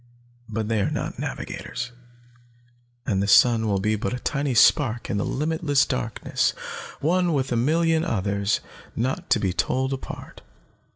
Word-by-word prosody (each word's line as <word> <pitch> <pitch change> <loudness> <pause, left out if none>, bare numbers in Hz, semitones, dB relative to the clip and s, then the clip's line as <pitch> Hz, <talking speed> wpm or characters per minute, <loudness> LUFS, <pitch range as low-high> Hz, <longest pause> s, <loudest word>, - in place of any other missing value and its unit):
But 110 -2 -2
they 110 -2 +1
are 95 - +1
not - - -4
navigators, 125 0 -5 1.1
and 100 -6 +1
the 100 - 0
sun 115 +1 +5
will 100 -2 +1
be 105 +2 +1
but 105 +2 -2
a - - -5
tiny 140 0 -1
spark 120 -1 +4
in 100 - 0
the 100 - 0
limitless 150 -1 +1
darkness, 120 -4 -1 0.5
one 175 +2 +2
with 135 -2 0
a - - +1
million 160 +6 +2
others, 100 - 0 0.3
not 130 +3 -2
to - - +4
be 95 -3 0
told 130 +7 0
apart. 135 - -8
125 Hz, 155 wpm, -24 LUFS, 105-145 Hz, 1.1 s, sun